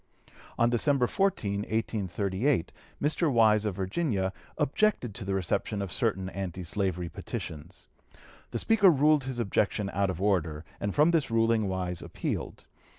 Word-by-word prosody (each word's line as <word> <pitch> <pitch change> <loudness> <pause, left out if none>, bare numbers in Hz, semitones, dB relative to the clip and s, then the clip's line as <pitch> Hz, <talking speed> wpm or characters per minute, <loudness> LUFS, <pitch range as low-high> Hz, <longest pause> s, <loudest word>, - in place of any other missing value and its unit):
On 115 - +4
December 125 +2 +2
14, 120 - 0
1838, 105 - -1 0.3
Mr. 155 +2 +1
Wise, 110 -3 +4
of 105 -3 -1
Virginia, 95 - -1 0.2
objected 150 - +1
to 105 - -6
the 95 0 -1
reception 95 +3 -1
of 100 -3 -3
certain 95 0 0
anti 95 -2 -5
slavery 90 -1 -1
petitions. 75 -2 -7 0.6
The - - -3
Speaker 205 -4 +5
ruled 150 -2 +4
his 130 -2 -4
objection 105 -2 0
out 100 +1 +1
of 90 -2 -3
order, 85 -6 0
and 100 -1 -2
from 150 +3 +5
this 165 -5 +1
ruling 115 -2 +2
Wise 90 -2 -2
appealed. - - -4
105 Hz, 145 wpm, -29 LUFS, 95-130 Hz, 0.6 s, Speaker